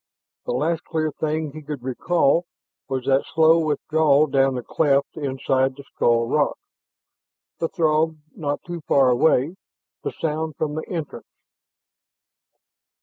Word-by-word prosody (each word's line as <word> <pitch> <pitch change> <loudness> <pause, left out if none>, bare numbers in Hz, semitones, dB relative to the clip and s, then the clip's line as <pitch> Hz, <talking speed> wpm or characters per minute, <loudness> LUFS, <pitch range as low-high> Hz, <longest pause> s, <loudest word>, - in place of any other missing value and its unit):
The - - -1
last 160 +5 0
clear 155 -1 -2
thing 155 0 -2
he 155 +2 -9
could 145 -4 -7
recall 165 +5 +1 0.4
was 130 -2 -2
that 135 0 +3
slow 160 +1 +6
withdrawal 155 -1 +2
down 135 -2 +2
the 125 - -4
cleft 140 +1 +1
inside 135 -2 0
the 140 - -11
skull 115 0 +2
rock, 145 +3 +1 1.0
the 165 - -1
Throg 160 -2 +1 0.2
not 145 -2 -3
too 175 -1 -6
far 135 -2 +4
away 145 +6 +2 0.4
the - - -3
sound 155 -1 -3
from 150 -1 -2
the 155 - -5
entrance. 165 -5 -5
150 Hz, 135 wpm, -23 LUFS, 135-160 Hz, 1.0 s, slow